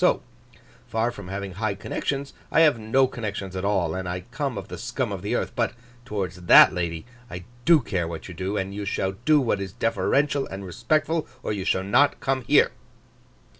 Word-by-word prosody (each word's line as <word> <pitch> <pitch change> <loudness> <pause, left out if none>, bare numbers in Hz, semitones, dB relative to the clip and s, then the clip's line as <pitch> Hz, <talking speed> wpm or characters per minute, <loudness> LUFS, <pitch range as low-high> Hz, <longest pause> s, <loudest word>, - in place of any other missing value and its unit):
So - - +3 0.6
far 115 +2 0
from 100 -6 -10
having 95 +1 -5
high 100 +2 -2
connections 140 +6 -3 0.2
I 165 - +5
have 150 -7 +5
no 115 +5 +3
connections 100 -6 -5
at 95 - -3
all, 95 -5 +1
and 95 -1 -4
I 90 +1 -3
come 140 -2 -2
of - - -6
the - - -8
scum 125 -1 -2
of 95 -3 -4
the 105 +5 -1
earth. - - -1
But 115 -2 0 0.3
towards 95 -6 -3
that - - +9
lady, 85 -3 -3 0.2
I 90 0 -7 0.2
do 165 -3 +6
care 90 -7 -2
what 80 -1 -7
you 90 - -8
do; 95 +4 -3
and 95 +1 -3
you 105 +1 -4
shall 95 -1 -1
do 155 -1 +6
what 115 -7 0
is 95 -1 -5
deferential 140 +5 +1
and 95 +1 -7
respectful, 155 - 0 0.2
or - - -1
you 95 -3 -4
shall 95 - +1
not 140 +9 +3
come 135 -1 0
here. - - +5
105 Hz, 205 wpm, -25 LUFS, 95-130 Hz, 0.6 s, that